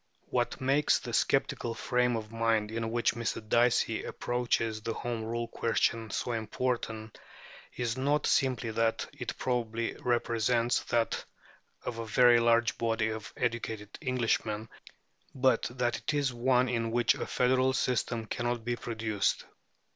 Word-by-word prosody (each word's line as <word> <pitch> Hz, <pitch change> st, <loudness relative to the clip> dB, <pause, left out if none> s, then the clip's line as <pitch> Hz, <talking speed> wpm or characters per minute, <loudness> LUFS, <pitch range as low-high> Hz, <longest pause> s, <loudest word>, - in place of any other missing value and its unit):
What -, -, 0 dB
makes 135 Hz, +3 st, +3 dB
the -, -, -7 dB
sceptical 115 Hz, -1 st, +1 dB
frame 125 Hz, -1 st, +1 dB
of 110 Hz, -1 st, -5 dB
mind 115 Hz, -2 st, +1 dB
in 115 Hz, 0 st, -2 dB
which 120 Hz, +1 st, +1 dB
Mr. 115 Hz, -1 st, -3 dB
Dicey 120 Hz, +2 st, +2 dB
approaches 115 Hz, -3 st, -1 dB
the 115 Hz, +1 st, -3 dB
Home 120 Hz, -2 st, -3 dB
Rule 115 Hz, +1 st, -3 dB
question 115 Hz, -1 st, 0 dB
so 120 Hz, -, -2 dB
important 110 Hz, -1 st, -3 dB, 0.6 s
is 120 Hz, 0 st, -2 dB
not 145 Hz, +3 st, +1 dB
simply 130 Hz, -3 st, +1 dB
that 115 Hz, +1 st, +1 dB
it -, -, -5 dB
probably 115 Hz, -2 st, -1 dB
represents 120 Hz, 0 st, +1 dB
that 115 Hz, -1 st, 0 dB, 0.6 s
of 115 Hz, -, -4 dB
a 115 Hz, -, -4 dB
very 120 Hz, +2 st, +6 dB
large 115 Hz, -1 st, +3 dB
body 115 Hz, -1 st, +1 dB
of 110 Hz, 0 st, -6 dB
educated 115 Hz, -3 st, -3 dB
Englishmen, 115 Hz, -5 st, -1 dB, 0.7 s
but 130 Hz, -3 st, +3 dB
that 120 Hz, -1 st, -1 dB
it 155 Hz, -, -2 dB
is 140 Hz, -3 st, +1 dB
one 125 Hz, +1 st, +3 dB
in 115 Hz, -2 st, -1 dB
which 120 Hz, 0 st, +3 dB
a -, -, -5 dB
federal 130 Hz, +1 st, +2 dB
system 125 Hz, -3 st, 0 dB
cannot 120 Hz, 0 st, -2 dB
be 120 Hz, 0 st, 0 dB
produced. 110 Hz, -4 st, -1 dB
115 Hz, 140 wpm, -30 LUFS, 115-125 Hz, 0.7 s, very